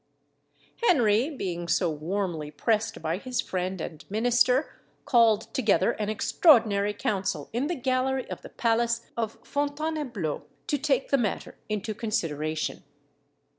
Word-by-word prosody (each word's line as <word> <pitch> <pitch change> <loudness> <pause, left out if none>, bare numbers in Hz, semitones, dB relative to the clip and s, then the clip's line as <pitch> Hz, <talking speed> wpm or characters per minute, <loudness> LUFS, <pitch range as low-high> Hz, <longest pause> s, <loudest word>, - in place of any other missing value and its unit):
] - - -25
Henry, 240 - +4
being 175 - -4
so 170 -1 +2
warmly 160 0 -3
pressed 220 +6 -1
by 160 +3 -1
his 250 +1 -3
friend 185 0 -2
and 160 0 -6
minister, 245 +5 +2 0.2
called 225 -4 +3
together 215 -7 +3
an 210 -1 -3
extraordinary 215 - +4
council 195 -7 -2
in 250 +5 0
the 350 - -1
gallery 260 0 0
of - - -5
the - - -10
palace 230 0 +1
of 225 -2 -3
Fontainebleau, 285 - -2 0.2
to 290 - 0
take 275 -1 0
the 275 - +4
matter 215 -5 -2
into 215 +1 -2
consideration. 155 -8 -2
220 Hz, 130 wpm, -27 LUFS, 185-255 Hz, 0.2 s, Henry